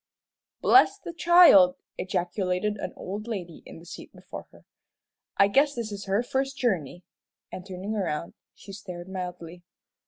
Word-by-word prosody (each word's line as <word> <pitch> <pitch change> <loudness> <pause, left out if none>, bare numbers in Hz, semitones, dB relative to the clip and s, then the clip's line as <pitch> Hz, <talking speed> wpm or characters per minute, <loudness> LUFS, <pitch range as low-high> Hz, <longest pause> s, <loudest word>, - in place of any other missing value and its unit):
"Bless 390 +1 +5
the 345 - -9
child!" 335 - +6 0.2
ejaculated 185 +2 -2
an - - -5
old 205 +4 -7
lady 180 -8 -6
in - - -11
the 165 - -14
seat 175 - -11
before - - -11
her, - - -20 0.7
"I 195 - +5
guess 280 +7 +2
this 230 -3 -4
is 200 -1 -7
her 200 +4 0
first 270 +2 -2
journey," 180 - -2 0.5
and 185 - -7
turning 190 +3 -5
around, 170 -5 -3 0.2
she 195 - -12
stared 180 -3 -9
mildly. 180 -2 -7
195 Hz, 150 wpm, -26 LUFS, 180-235 Hz, 0.7 s, child